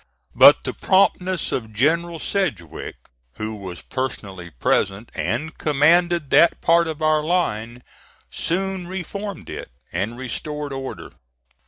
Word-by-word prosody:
But - - +8
the - - -3
promptness 185 -1 +2
of 110 -3 -3
General 165 +8 +1
Sedgwick, 145 - -3 0.4
who 110 +6 -4
was 95 -4 -8
personally 100 -9 -5
present 95 - 0
and 155 +8 -2
commanded 165 +1 +3
that 170 - +5
part 170 0 +3
of 160 -1 -5
our 155 0 +3
line, 125 -9 -1 0.5
soon 190 +1 -2
reformed 195 +2 -6
it - - -7 0.2
and 115 +4 -2
restored 145 +3 -4
order. 135 0 -6
150 Hz, 120 wpm, -22 LUFS, 115-175 Hz, 0.5 s, But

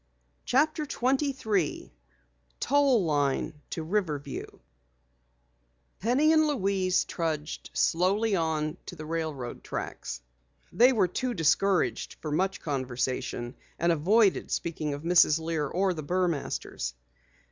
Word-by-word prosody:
CHAPTER 300 +3 +2
23 255 - 0 0.7
TOLL 270 -7 +3
LINE 145 -1 0
TO 160 - -4
RIVERVIEW 155 -6 -3 1.4
Penny 265 - +3
and 310 -1 +4
Louise 195 -8 +1
trudged 155 -3 -3
slowly 195 +5 +2
on 155 -3 -1
toward 175 - -8
the 155 - -7
railroad 155 -6 -4
tracks. - - -5 0.5
They 245 +3 +6
were 210 -7 +3
too 245 +7 -2
discouraged 185 +2 +1
for 155 - -5
much 190 +6 0
conversation, 130 -3 -2 0.2
and 170 +1 +2
avoided 195 +6 +3
speaking 155 -3 -2
of 145 - -9
Mrs. 170 -3 +5
Lear 160 -2 -2
or 185 +4 +1
the 155 - -5
Burmasters. 155 - -2
170 Hz, 110 wpm, -28 LUFS, 150-215 Hz, 1.4 s, They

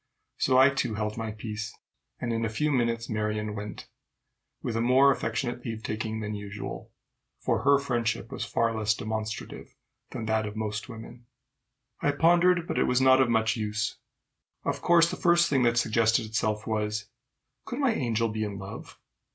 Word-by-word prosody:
So 130 -1 +3
I, 130 +2 +7
too, 125 -5 -1
held 105 0 -2
my 115 -1 -4
peace, 110 0 -6 0.4
and 120 -1 -2
in 115 0 -1
a 115 - 0
few 150 +8 0
minutes 115 -3 0
Marion 105 0 -2
went, 105 0 -7 0.8
with 115 - -2
a 115 - +1
more 130 +3 +5
affectionate 120 0 -2
leave 115 -2 -5
taking 110 0 -3
than 105 0 -4
usual, 105 0 -7 0.5
for - - 0
her 140 0 +5
friendship 120 -5 -1
was - - -4
far 115 -1 0
less 110 0 +1
demonstrative 110 0 -5 0.3
than 110 - -5
that 110 -1 0
of 105 - -7
most 110 +1 -3
women. 120 +1 -10 0.7
I 145 - +2
pondered, 170 +3 +4
but - - -1
it - - +3
was 125 0 +2
not 130 0 +6
of 130 - +3
much 110 -1 +2
use. 105 -1 -2 0.7
Of - - -1
course 170 -1 +5
the - - -4
first 170 -2 +4
thing 135 -3 +3
that 120 -1 +3
suggested 115 0 +2
itself 110 -1 -1
was, 105 -1 -1 0.6
Could 245 - -5
my 270 -5 +2
angel 115 - 0
be 110 0 -2
in 100 -2 -4
love? 100 0 -9
115 Hz, 175 wpm, -28 LUFS, 110-130 Hz, 0.8 s, I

